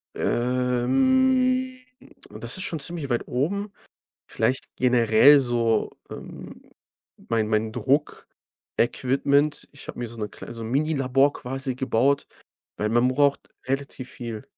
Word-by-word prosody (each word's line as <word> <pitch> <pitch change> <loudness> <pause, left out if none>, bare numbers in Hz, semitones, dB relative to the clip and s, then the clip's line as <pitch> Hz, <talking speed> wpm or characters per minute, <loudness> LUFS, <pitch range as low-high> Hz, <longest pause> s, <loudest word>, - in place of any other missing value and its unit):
Ähm, 255 - +1 0.5
das - - -5
ist 185 - -3
schon 165 - -3
ziemlich 150 -1 -5
weit 120 -1 -1
oben. 200 +11 -2 0.6
Vielleicht 130 - -1
generell 125 +3 +5
so, 120 -3 0 0.2
ähm, - - -10 0.7
mein 110 -2 +1
mein 110 0 0
Druck-Equipment. 140 +1 -1
Ich 145 - -13
habe - - -7
mir 120 - -3
so 115 +1 -11
'ne 105 -1 -4
klei - - -10
so 115 -1 -7
'n 110 - -5
Minilabor 140 -1 +2
quasi 135 0 -5
gebaut, 130 +2 +1 0.5
weil 105 - -1
man 120 +2 +3
braucht 140 +1 +1 0.2
relativ 135 -1 -4
viel. 115 -3 -7
130 Hz, 125 wpm, -24 LUFS, 120-145 Hz, 0.7 s, generell